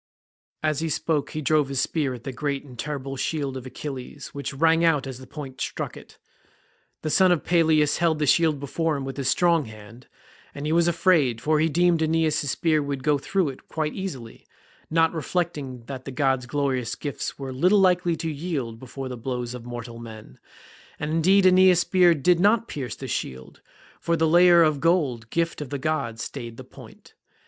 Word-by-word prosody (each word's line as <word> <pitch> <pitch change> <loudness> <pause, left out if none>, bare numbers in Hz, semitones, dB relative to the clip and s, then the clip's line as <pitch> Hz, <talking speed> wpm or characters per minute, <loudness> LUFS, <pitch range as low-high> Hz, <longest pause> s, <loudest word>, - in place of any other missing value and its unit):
As 155 -2 +1
he 165 0 -2
spoke 155 -1 -1
he 155 - -5
drove 150 -1 +2
his 135 -2 -2
spear 140 -5 -1
at 120 - -12
the 135 - -4
great 140 +1 -3
and 130 -3 -12
terrible 135 +1 -5
shield 140 -2 -2
of 130 -1 -7
Achilles, 135 +1 -7
which 140 0 -5
rang 165 +4 +3
out 150 -5 +3
as 130 -2 -7
the 130 - -12
point 135 -4 -8
struck - - -4
it. - - -14 0.9
The 155 - -1
son 185 +2 +5
of 175 - +1
Peleus 155 -3 +3
held 165 -2 +2
the 150 - 0
shield 155 0 +3
before 155 +2 -1
him 135 - -5
with 135 +1 -6
his 135 -2 0
strong 170 -3 +3
hand, 110 +2 -13 0.5
and 145 +1 -5
he 155 - -1
was 170 +1 +3
afraid, 165 -8 +2
for 155 +5 +1
he 160 +1 +2
deemed 175 +2 +3
that 160 - +2
Aeneas's 160 -2 +1
spear 155 -1 +1
would 140 -2 -4
go 150 -1 +2
through 180 +3 0
it 130 - -11
quite 155 -2 -2
easily, 135 - -7 0.4
not 165 +1 +3
reflecting 150 -7 -3
that 130 0 -7
the 135 - -6
god's 130 -1 0
glorious 130 -4 -1
gifts 145 -2 -5
were 135 -2 -6
little 180 +10 +3
likely 180 -2 +3
to 165 - -4
yield 140 -7 -4
before 130 +1 -7
the 125 - -5
blows 125 0 -4
of 125 -2 -8
mortal 120 -1 -7
men; 110 - -11 0.6
and 150 +1 -3
indeed 185 +5 +4
Aeneas's 185 -1 +6
spear 180 -1 +4
did 170 +4 +3
not 215 +4 +3
pierce 130 -7 -5
the - - -7
shield, 65 0 -5 0.4
for 170 0 0
the 160 0 +2
layer 175 +1 +6
of 155 -3 +2
gold, 140 -10 +1
gift 165 +1 -1
of 145 - -6
the 140 - -3
god, 135 -6 -2
stayed 120 -3 -6
the - - -8
point. - - -15
150 Hz, 200 wpm, -24 LUFS, 130-165 Hz, 0.9 s, Aeneas's